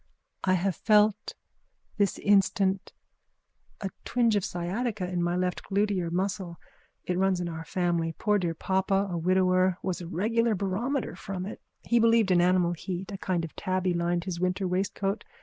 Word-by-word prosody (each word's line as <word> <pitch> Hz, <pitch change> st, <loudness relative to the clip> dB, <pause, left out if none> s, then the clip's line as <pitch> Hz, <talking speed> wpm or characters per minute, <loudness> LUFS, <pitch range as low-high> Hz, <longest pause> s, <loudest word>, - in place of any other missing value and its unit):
I 185 Hz, -, +3 dB
have 185 Hz, 0 st, 0 dB
felt 210 Hz, +1 st, +2 dB, 0.6 s
this 200 Hz, -3 st, +1 dB
instant 195 Hz, -1 st, +2 dB, 0.9 s
a 195 Hz, -2 st, -3 dB
twinge 235 Hz, -3 st, +2 dB
of 200 Hz, -, +1 dB
sciatica 190 Hz, +4 st, -2 dB
in 180 Hz, -1 st, -2 dB
my 175 Hz, 0 st, 0 dB
left 180 Hz, 0 st, -1 dB
glutear 200 Hz, -3 st, 0 dB
muscle. 185 Hz, -1 st, -2 dB, 0.5 s
It 180 Hz, 0 st, -1 dB
runs 190 Hz, -1 st, +2 dB
in 175 Hz, -, -2 dB
our 165 Hz, -1 st, -5 dB
family. 170 Hz, -2 st, -1 dB
Poor 210 Hz, -1 st, +2 dB
dear 170 Hz, -3 st, -1 dB
papa, 195 Hz, +3 st, +1 dB
a 175 Hz, -, -2 dB
widower, 185 Hz, +1 st, +3 dB
was 185 Hz, -1 st, -2 dB
a 170 Hz, -, -6 dB
regular 225 Hz, +6 st, +1 dB
barometer 210 Hz, +7 st, -2 dB
from 185 Hz, 0 st, -5 dB
it. 210 Hz, -, -8 dB, 0.2 s
He 235 Hz, -, +2 dB
believed 230 Hz, -3 st, +4 dB
in 175 Hz, -1 st, +5 dB
animal 180 Hz, -1 st, +3 dB
heat. 185 Hz, +3 st, -5 dB
A 195 Hz, -, -5 dB
skin 180 Hz, -3 st, -1 dB
of 165 Hz, -, -7 dB
tabby 185 Hz, -1 st, 0 dB
lined 170 Hz, 0 st, 0 dB
his 175 Hz, -2 st, -4 dB
winter 185 Hz, +1 st, 0 dB
waistcoat. 195 Hz, +2 st, -1 dB
185 Hz, 165 wpm, -28 LUFS, 175-200 Hz, 0.9 s, in